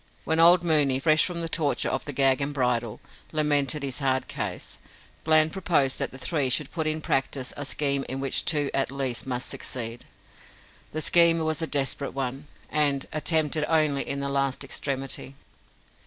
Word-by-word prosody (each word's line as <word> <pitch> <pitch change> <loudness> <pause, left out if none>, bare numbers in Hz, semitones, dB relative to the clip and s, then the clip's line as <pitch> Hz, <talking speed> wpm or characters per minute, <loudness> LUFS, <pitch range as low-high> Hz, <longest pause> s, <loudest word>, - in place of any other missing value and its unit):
When 160 +1 0
old 170 +1 +6
Mooney, 150 -6 +3
fresh 155 +3 +3
from 175 -2 -3
the 165 - -2
torture 160 -3 -1
of - - -2
the 145 - -4
gag 135 0 +2
and 145 +1 -2
bridle, 120 -4 -1 0.3
lamented 150 -2 0
his 135 -1 -3
hard 130 -2 0
case, - - -5 0.4
Bland 155 0 +3
proposed 160 -8 +1
that - - -1
the 130 - -11
three 140 -1 0
should 140 +3 -1
put 160 -2 -2
in 155 0 -1
practice 135 -2 -1
a 145 - -5
scheme 140 -1 0
in 130 - -4
which 135 -1 0
two 145 -3 0
at 135 - 0
least 135 -3 -3
must 125 -1 -3
succeed. 115 -1 -5 0.9
The 155 0 -3
scheme 170 -1 +5
was 160 0 -1
a 160 - 0
desperate 140 -1 0
one, 135 +2 -4 0.2
and 145 -2 +2
attempted 155 0 +1
only 155 -4 +2
in 140 - -3
the 140 - -2
last 140 -1 0
extremity. 135 0 -3
140 Hz, 175 wpm, -26 LUFS, 135-155 Hz, 0.9 s, old